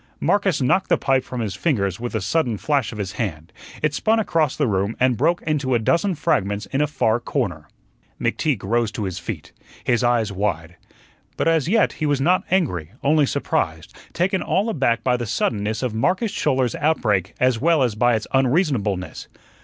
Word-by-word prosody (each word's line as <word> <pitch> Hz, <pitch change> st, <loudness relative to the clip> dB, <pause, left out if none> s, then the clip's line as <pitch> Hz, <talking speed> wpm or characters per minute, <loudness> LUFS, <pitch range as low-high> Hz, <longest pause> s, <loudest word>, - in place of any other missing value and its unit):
Marcus 195 Hz, -9 st, +1 dB
knocked 185 Hz, +9 st, +2 dB
the -, -, +4 dB
pipe 135 Hz, -1 st, +1 dB
from 125 Hz, -2 st, -5 dB
his 105 Hz, -4 st, -2 dB
fingers 100 Hz, -, -1 dB
with 120 Hz, -1 st, -4 dB
a 110 Hz, -, 0 dB
sudden 120 Hz, -, 0 dB
flash 140 Hz, -1 st, 0 dB
of 110 Hz, -, -8 dB
his 100 Hz, -4 st, -3 dB
hand; 85 Hz, -8 st, -5 dB, 0.3 s
it 155 Hz, -1 st, +2 dB
spun 220 Hz, +8 st, +2 dB
across 165 Hz, -9 st, +1 dB
the 145 Hz, -, +2 dB
room 100 Hz, -1 st, -1 dB
and 130 Hz, -1 st, +3 dB
broke 165 Hz, +8 st, +1 dB
into 145 Hz, -5 st, 0 dB
a -, -, +5 dB
dozen 170 Hz, -, +1 dB
fragments 100 Hz, -6 st, 0 dB
in 135 Hz, -, +1 dB
a 150 Hz, -, +2 dB
far 115 Hz, -6 st, +1 dB
corner. 90 Hz, -, -3 dB, 0.5 s
McTeague -, -, -1 dB
rose 115 Hz, +2 st, 0 dB
to 115 Hz, -4 st, -3 dB
his 95 Hz, -3 st, -4 dB
feet, -, -, -7 dB, 0.3 s
his 120 Hz, 0 st, +1 dB
eyes 120 Hz, -3 st, +2 dB
wide. 90 Hz, -4 st, -2 dB, 0.6 s
But -, -, 0 dB
as 160 Hz, -3 st, +2 dB
yet 220 Hz, +4 st, +3 dB
he 155 Hz, -, -2 dB
was 145 Hz, -2 st, +1 dB
not 180 Hz, +7 st, +2 dB
angry, 100 Hz, -, 0 dB
only 145 Hz, 0 st, +3 dB
surprised, 80 Hz, -, -2 dB, 0.2 s
taken 185 Hz, +2 st, 0 dB
all 200 Hz, +5 st, 0 dB
aback 130 Hz, -, 0 dB
by 125 Hz, -1 st, +2 dB
the 120 Hz, -2 st, -4 dB
suddenness 110 Hz, 0 st, -1 dB
of 125 Hz, -4 st, -1 dB
Marcus 185 Hz, -, 0 dB
Schouler's 130 Hz, -, 0 dB
outbreak 105 Hz, -, 0 dB
as 125 Hz, -3 st, +2 dB
well 160 Hz, -2 st, +3 dB
as 120 Hz, -4 st, +1 dB
by 120 Hz, +3 st, +2 dB
its 110 Hz, -, -2 dB
unreasonableness. 130 Hz, -, 0 dB
125 Hz, 190 wpm, -22 LUFS, 105-155 Hz, 0.6 s, a